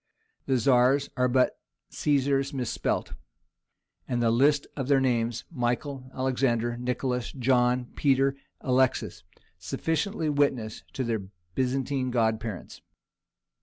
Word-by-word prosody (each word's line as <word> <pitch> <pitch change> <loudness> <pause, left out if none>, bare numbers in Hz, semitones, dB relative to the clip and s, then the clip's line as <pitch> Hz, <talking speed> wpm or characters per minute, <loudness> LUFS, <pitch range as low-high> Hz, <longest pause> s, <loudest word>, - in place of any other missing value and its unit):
The 135 - +2
Tzars 130 +3 +3
are 125 -1 +2
but 125 +1 +2 0.3
Caesars 140 -1 +1
misspelt, 125 -3 -2 0.9
and 120 - -1
the 115 -1 +3
list 140 +4 +3
of 135 -3 -3
their 140 -1 +4
names—Michael, 125 +2 -1
Alexander, 120 -3 0
Nicholas, 125 0 -2
John, 125 -1 +2
Peter, 135 -1 +2 0.3
Alexis—sufficiently 130 - -1
witnesses 140 -7 0
to 130 - -2
their 115 -2 -1 0.3
Byzantine 130 0 0
godparents. 110 -4 -2
130 Hz, 95 wpm, -27 LUFS, 120-135 Hz, 0.9 s, their